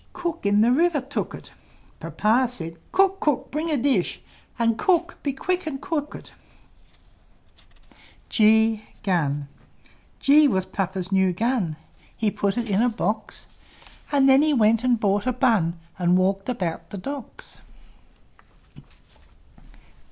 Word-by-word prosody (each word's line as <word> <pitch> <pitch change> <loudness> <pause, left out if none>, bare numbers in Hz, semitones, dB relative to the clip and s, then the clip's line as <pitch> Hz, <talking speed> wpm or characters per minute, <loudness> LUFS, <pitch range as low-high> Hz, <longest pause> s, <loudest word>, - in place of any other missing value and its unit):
Cook 345 - -3
in 205 +1 +3
the 235 +2 +4
river 325 +3 +2
took 275 +2 -4
it - - -13 0.5
Papa 235 +4 +1
said, 165 -8 -6
"Cook! 390 0 +2
Cook! 295 -4 -1
bring 310 +4 -2
a 300 - +1
dish! 255 -8 0 0.4
And, 230 -2 +2
Cook! 345 - 0
be 280 - -1
quick 360 +6 -2
and 270 -3 -4
cook 300 -2 -3
it!" - - -12 1.9
G 220 0 +3 1.4
G 295 +2 +5
was 190 -7 0
Papa's 190 -1 -4
new 190 -1 +2
Gun; 215 -5 -1 0.4
He 215 -2 0
put 200 0 -1
it 235 -1 -2
in 200 0 +1
a 245 - +3
box; 215 -1 -3 0.7
And 275 -2 +4
then 270 +1 +6
he 305 -1 +2
went 225 0 +3
and 245 -3 +2
bought 205 +2 0
a - - +3
bun, 220 -10 +1 0.2
And 180 0 +3
walked 195 +3 0
about 180 -10 -3
the 205 - -7
Docks. 280 - -8
235 Hz, 135 wpm, -24 LUFS, 200-285 Hz, 1.9 s, then